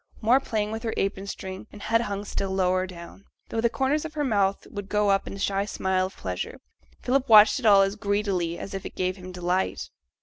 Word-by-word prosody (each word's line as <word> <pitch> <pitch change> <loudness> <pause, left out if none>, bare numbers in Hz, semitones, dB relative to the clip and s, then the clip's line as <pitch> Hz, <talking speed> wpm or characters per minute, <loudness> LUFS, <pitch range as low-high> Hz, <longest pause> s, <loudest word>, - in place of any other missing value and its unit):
More 240 +4 +4
playing 215 -5 -2
with 220 0 -4
her 230 -1 -3
apron 195 0 -1
string, 190 0 -7
and 210 - -11
head 230 +2 +1
hung 205 -2 -4
still 195 -1 -3
lower 185 -1 +1
down, 180 +2 -11 0.2
though 225 - -1
the 235 - +3
corners 270 +5 0
of 315 -1 -7
her 295 - 0
mouth 200 -6 +1
would 205 -2 -6
go 210 -1 +2
up 195 - +1
in - - -6
a - - -7
shy 195 0 0
smile 190 -2 0
of 190 - -15
pleasure. 90 -1 -5 0.4
Philip 270 +1 +1
watched 215 +4 +8
it 240 - 0
all 200 -2 +7
as 195 +1 -1
greedily 200 -5 -1
as 195 - -7
if 195 - -4
it - - -8
gave 185 0 -1
him 185 0 -9
delight. 180 +1 -2
200 Hz, 230 wpm, -26 LUFS, 190-220 Hz, 0.4 s, watched